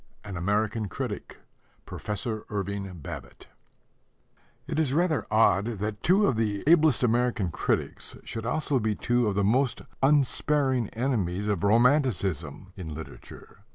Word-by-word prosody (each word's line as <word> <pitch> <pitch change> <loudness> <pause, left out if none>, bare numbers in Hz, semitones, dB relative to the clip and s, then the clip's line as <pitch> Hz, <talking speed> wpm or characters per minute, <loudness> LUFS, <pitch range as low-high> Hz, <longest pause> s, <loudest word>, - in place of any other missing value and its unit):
AN 100 -3 -7
AMERICAN 105 +4 0
CRITIC: - - -5 0.5
PROFESSOR 105 +1 -4
IRVING 100 -3 -4
BABBITT - - -9 1.2
It - - -2
is 145 -4 +1
rather 165 -3 +1
odd 100 -3 +4
that 105 +1 -4
two 195 +4 +4
of 125 - +1
the 105 -3 -1
ablest 155 -5 +5
American 120 -6 +1
critics - - -2
should 115 0 -5
also 145 -1 0
be 110 -2 0
two 120 +1 +1
of 100 - 0
the 100 - +2
most 125 +5 +1 0.2
unsparing 135 -3 +2
enemies 105 -6 -1
of 100 -3 -1
romanticism 100 - +1
in 85 -5 -7
literature. 80 +1 -10
110 Hz, 130 wpm, -27 LUFS, 100-130 Hz, 1.2 s, ablest